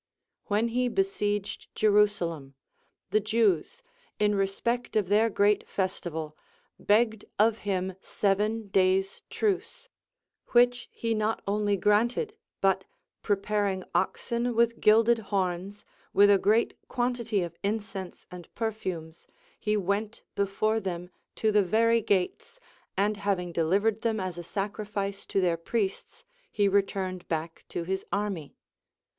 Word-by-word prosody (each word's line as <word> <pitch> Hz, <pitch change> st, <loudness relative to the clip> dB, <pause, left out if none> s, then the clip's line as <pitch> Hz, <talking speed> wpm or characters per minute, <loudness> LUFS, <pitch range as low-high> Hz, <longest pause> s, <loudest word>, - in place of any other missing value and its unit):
When 215 Hz, +3 st, +1 dB
he 250 Hz, +2 st, +1 dB
besieged 210 Hz, -, -1 dB
Jerusa 210 Hz, -3 st, +3 dB
lem, 140 Hz, -5 st, -8 dB, 0.6 s
the 215 Hz, -, +4 dB
Jews, 215 Hz, -, +1 dB, 0.3 s
in 210 Hz, 0 st, +2 dB
respect 205 Hz, +5 st, -1 dB
of 205 Hz, -4 st, +1 dB
their 215 Hz, +3 st, +4 dB
great 205 Hz, 0 st, +2 dB
festival, 160 Hz, -5 st, -3 dB, 0.4 s
begged 220 Hz, 0 st, +2 dB
of 220 Hz, +1 st, +3 dB
him 190 Hz, -1 st, -1 dB
seven 210 Hz, +2 st, 0 dB
days' 190 Hz, 0 st, +2 dB
truce; 465 Hz, +4 st, -2 dB, 0.6 s
which 245 Hz, 0 st, +4 dB
he 230 Hz, -1 st, -2 dB
not 215 Hz, 0 st, -1 dB
only 205 Hz, 0 st, +1 dB
granted, 235 Hz, -, +2 dB, 0.3 s
but 195 Hz, -1 st, +3 dB, 0.4 s
preparing 200 Hz, -2 st, 0 dB
oxen 235 Hz, 0 st, 0 dB
with 235 Hz, 0 st, +2 dB
gilded 225 Hz, +2 st, +5 dB
horns, 195 Hz, -1 st, -2 dB, 0.3 s
with 205 Hz, 0 st, +6 dB
a 200 Hz, -, +5 dB
great 215 Hz, +4 st, +3 dB
quantity 240 Hz, -5 st, 0 dB
of 170 Hz, -1 st, -6 dB
incense 205 Hz, -3 st, -4 dB
and 180 Hz, -1 st, -10 dB
perfumes, 185 Hz, -8 st, -4 dB, 0.3 s
he 210 Hz, 0 st, 0 dB
went 205 Hz, +3 st, -2 dB
before 210 Hz, +2 st, +1 dB
them 180 Hz, -3 st, -5 dB, 0.2 s
to 220 Hz, -, +1 dB
the 210 Hz, 0 st, +5 dB
very 230 Hz, +4 st, +3 dB
gates, 200 Hz, -, -1 dB, 0.4 s
and 205 Hz, +2 st, +1 dB
having 195 Hz, -3 st, -1 dB
delivered 200 Hz, +7 st, +1 dB
them 225 Hz, -2 st, 0 dB
as 185 Hz, -2 st, -4 dB
a -, -, -6 dB
sacrifice 200 Hz, +1 st, -4 dB
to -, -, 0 dB
their 175 Hz, -3 st, +2 dB
priests, 195 Hz, +3 st, -3 dB, 0.3 s
he 205 Hz, -2 st, +2 dB
returned 190 Hz, -2 st, 0 dB
back 165 Hz, 0 st, -4 dB
to 170 Hz, -, -3 dB
his 190 Hz, +2 st, -2 dB
army. 200 Hz, -7 st, -3 dB
205 Hz, 125 wpm, -28 LUFS, 190-220 Hz, 0.6 s, with